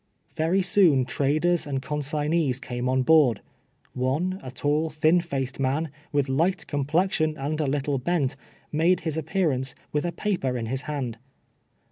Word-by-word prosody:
Very 170 +5 +2
soon 170 -9 +4
traders 155 +6 +1
and 135 -2 -1
consignees 150 0 0
came 125 -1 -3
on 130 0 +2
board. 145 -6 +5 0.5
One, 155 +10 -1
a 130 - -7
tall, 150 +4 0
thin 155 +3 +3
faced 135 -6 -4
man, 140 +4 0 0.2
with 145 -2 +1
light 165 +8 +1
complexion 155 +2 0
and 150 +3 -2
a 150 - 0
little 140 0 0
bent, 145 -1 0 0.4
made 165 +4 +2
his 160 -3 -2
appearance, 155 -5 -1 0.2
with 150 - 0
a 175 - -1
paper 170 -12 -1
in 115 - -3
his 130 +3 -2
hand. 125 -6 -3
150 Hz, 150 wpm, -25 LUFS, 135-165 Hz, 0.5 s, board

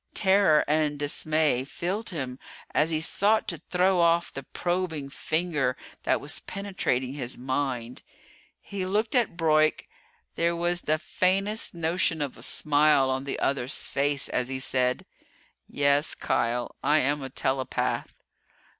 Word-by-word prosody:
Terror 190 -6 +4
and 150 -1 +1
dismay 145 -2 +1
filled 180 +10 -3
him 135 -7 -5 0.3
as 155 +2 +3
he 155 -1 0
sought 210 +6 +2
to - - -6
throw 185 +1 +3
off 170 0 +3
the 135 - -5
probing 170 -2 -3
finger 155 -5 -1 0.2
that - - +1
was - - -3
penetrating 185 -10 -2
his 125 -3 -4
mind. 130 -2 -3 0.6
He 200 -2 -5
looked 210 +4 0
at 240 -9 +1
Broyk. 155 -2 +2 0.5
There 170 0 +1
was 175 +1 0
the 155 +1 +1
faintest 195 +6 0
notion 165 0 +1
of 145 -3 -3
a - - -14
smile 145 -3 +3
on 130 +1 -2
the 140 - -3
other's 135 -1 0
face 140 0 0
as 125 - -1
he 130 0 -3
said: 130 -1 0 0.6
"Yes, 145 +1 +1
Kial 120 +1 -1
I 150 +1 +4
am 145 0 +1
a 135 - -5
Telepath." 130 0 -2
155 Hz, 140 wpm, -27 LUFS, 135-175 Hz, 0.6 s, Terror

